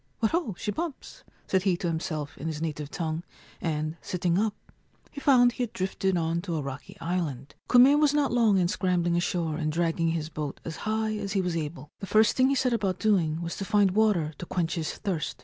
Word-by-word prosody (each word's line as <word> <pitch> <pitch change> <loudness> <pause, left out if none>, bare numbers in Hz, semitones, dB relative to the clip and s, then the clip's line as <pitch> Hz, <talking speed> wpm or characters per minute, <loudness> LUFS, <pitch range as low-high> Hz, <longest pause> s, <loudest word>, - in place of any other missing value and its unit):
4 220 - +3
What - - -11
ho, 325 - -1
she 210 - -2
bumps! 320 +2 -6
' - - -34
said 190 - +2
he 185 -2 +1
to 175 - -2
himself 160 -3 -3
in 160 - -4
his 155 -2 -3
native 150 -2 -4
tongue, 160 -1 -3 0.4
and, 155 -1 -2
sitting 175 0 0
up, 215 -1 0 0.6
he 285 - -8
found 245 -3 +5
he 250 - -6
had 240 -3 -2
drifted 190 0 -1
on 165 0 0
to 175 -2 -3
a 155 - -1
rocky 135 0 -7
island. 160 -6 -3 0.2
Kume 260 +4 +7
was 300 -2 +4
not 295 -2 +1
long 225 -5 +4
in 180 -2 +3
scrambling 175 -3 +1
ashore 170 -2 0
and 155 -2 -1
dragging 165 0 0
his 165 -1 -1
boat 150 -3 -5
as 160 - -5
high 220 0 0
as 200 -2 -4
he 195 - +2
was 180 -2 -1
able. 150 -2 -5
The 195 - -6
first 215 +2 +4
thing 260 0 +4
he 275 - +2
set 255 -2 +1
about 195 -5 0
doing 175 -7 +1
was 170 - -4
to - - -3
find 205 -1 +3
water 190 -7 +2
to - - -5
quench 170 -2 -1
his 165 -3 -2
thirst. 175 -7 -3
180 Hz, 230 wpm, -27 LUFS, 160-215 Hz, 0.6 s, Kume